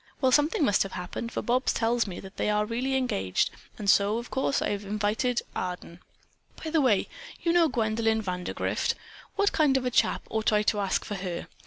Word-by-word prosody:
"Well, 260 -2 +3
something 295 +2 +3
must 205 - +3
have 195 - -1
happened, 185 +6 -5
for - - -3
Bobs 250 +2 +1
tells 230 0 +1
me 180 - -6
that 190 0 -12
they - - 0
are 210 0 +2
really 250 +4 -1
engaged, 95 - 0 0.3
and 205 - -6
so, 200 +2 +4
of 235 +1 -6
course 265 +1 +1
I - - -1
have 200 -1 -2
also 200 - -10
invited 215 +4 0
Arden. 180 -1 -5 0.6
By 320 - -4
the 320 -1 +3
way, 230 -8 +3 0.4
you 335 - +2
know 345 -2 +5
Gwendolyn 225 -2 +1
Vandergrift. 180 -2 -1 0.4
What 405 0 +2
kind 295 -4 +3
of 255 - -2
a 250 - 0
chap - - +2
ought 220 0 +1
I 210 0 +3
to 210 0 +1
ask 195 -2 0
for - - -5
her? 180 -3 -4
220 Hz, 210 wpm, -27 LUFS, 200-255 Hz, 0.6 s, know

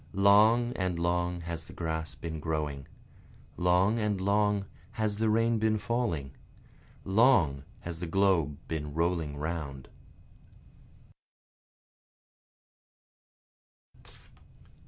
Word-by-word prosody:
Long 110 +5 +5
and 90 -2 -1
long 85 +1 -1
has 85 -1 -6
the - - -13
grass 80 -1 -4
been 80 -2 -6
growing, 75 -3 -3 0.7
Long 90 +5 +2
and 105 -3 0
long 100 +1 +1 0.3
has 105 -1 -1
the 110 0 +2
rain 115 +1 +2
been 110 0 +2
falling, 105 - -2 0.7
Long 95 - +4 0.2
has 85 -1 -6
the 90 - -4
globe 85 -5 +2
been 75 -2 -4
rolling 80 -3 -1
round. 75 -4 -5
90 Hz, 95 wpm, -29 LUFS, 80-105 Hz, 0.7 s, Long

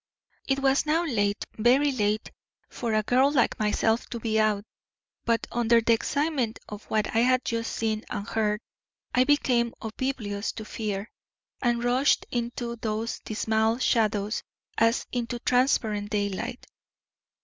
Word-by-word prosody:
"It 270 - +2
was 275 +2 +2
now 325 +3 +2
late, 205 -8 0
very 260 +6 +4
late, 215 -4 -1 0.4
for 230 -3 -2
a 215 - +2
girl 260 +6 +3
like 265 -5 +2
myself 220 +2 +1
to 235 - -5
be 220 -1 0
out, 215 -1 +1 0.6
but, 230 -1 +1
under 235 0 +4
the 230 0 +3
excitement 270 -1 0
of 210 0 -9
what 215 0 -1
I - - +5
had 255 +2 +3
just 230 -1 -2
seen 220 -1 -1
and 205 +1 -4
heard, 215 -1 0 0.5
I 255 +1 +4
became 250 -5 +2
oblivious 220 -3 -3
to 220 - -7
fear, 210 -1 -4 0.5
and 240 -1 +1
rushed 255 +4 +3
into 235 0 -3
those 220 +1 -3
dismal 220 +1 0
shadows 215 -4 +1 0.3
as 230 +2 +2
into 240 0 -2
transparent 235 -5 +1
daylight. 205 +3 -2
230 Hz, 140 wpm, -27 LUFS, 215-250 Hz, 0.6 s, I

